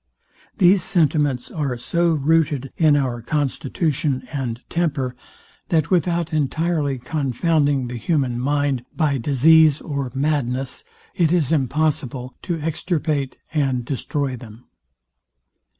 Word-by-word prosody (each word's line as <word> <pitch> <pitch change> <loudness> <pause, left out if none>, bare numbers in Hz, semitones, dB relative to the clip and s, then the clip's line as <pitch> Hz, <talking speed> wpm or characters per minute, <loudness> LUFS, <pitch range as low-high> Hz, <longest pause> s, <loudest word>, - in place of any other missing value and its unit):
These 185 +1 +5
sentiments 150 -8 +1
are 140 -6 -2
so 170 +7 +1
rooted 145 -2 +1
in 155 -3 +4
our 125 -4 -1
constitution 140 0 -1
and 125 -5 -3
temper, 145 -7 -1 0.5
that 160 -1 +1
without 170 -2 +1
entirely 155 -1 0
confounding 140 +1 0
the 120 0 -5
human 130 -2 0
mind 140 -1 0
by 145 -5 +1
disease 150 +4 +5
or 140 -4 -4
madness, 135 -2 -1 0.3
it 165 -3 +2
is 165 -6 +2
impossible 135 -3 -1
to 170 -3 -3
extirpate 155 -3 -2 0.2
and 135 -5 0
destroy 140 0 -2
them. 115 -1 -12
145 Hz, 110 wpm, -21 LUFS, 130-160 Hz, 0.5 s, These